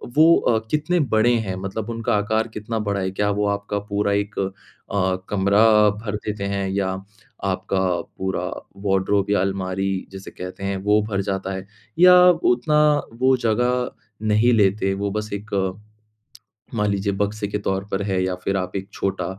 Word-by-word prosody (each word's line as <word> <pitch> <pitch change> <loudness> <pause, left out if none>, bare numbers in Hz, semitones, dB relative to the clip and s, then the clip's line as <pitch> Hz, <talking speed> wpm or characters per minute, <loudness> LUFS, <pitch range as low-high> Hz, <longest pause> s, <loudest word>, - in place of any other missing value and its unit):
वो 160 +2 +7
अ, 115 - +2
कितने 160 +4 +1
बड़े 115 +3 +4
हैं 95 - -2
मतलब 100 +3 -4
उनका 115 -2 -1
आकार 110 +2 0
कितना 110 +1 -4
बड़ा 100 -2 -1
है? 95 0 -2
क्या 105 +1 0
वो 105 +1 0
आपका 100 0 -2
पूरा 100 0 0
एक 100 0 -2
अ, 95 0 -3
कमरा 100 +2 +3 0.4
भर 105 -1 -3
देते 105 -1 -3
हैं 100 -1 -1
या 95 0 0 0.6
आपका 95 0 -1 0.4
पूरा 95 0 -2 0.4
वार्डरोब 95 +1 +1
या 100 - +3
अलमारी 95 0 -1 0.2
जिसे 95 0 -9
कहते 90 +2 -8
हैं 100 0 -1
वो 105 +1 +3
भर 100 -1 0
जाता 95 -1 -3
है? 95 +1 -7 0.3
या 180 0 +9 0.2
उतना 150 -2 +2 0.4
वो 130 +1 +4
जगह 125 +2 0 0.4
नहीं 110 +3 +4
लेते 100 -2 +2
वो 100 0 -2
बस 105 +1 -3
एक 105 +1 -6 1.2
मान 105 -2 +1
लीजिए 100 0 0
बक्से 105 +1 -2
के 105 - -2
तौर 95 +1 -1
पर 95 - -1
है? 95 -2 0
या 95 -1 -1
फ़िर 95 +2 -2
आप 90 0 -4
एक 95 +1 -4
छोटा 95 -2 -2
100 Hz, 170 wpm, -22 LUFS, 95-110 Hz, 1.2 s, या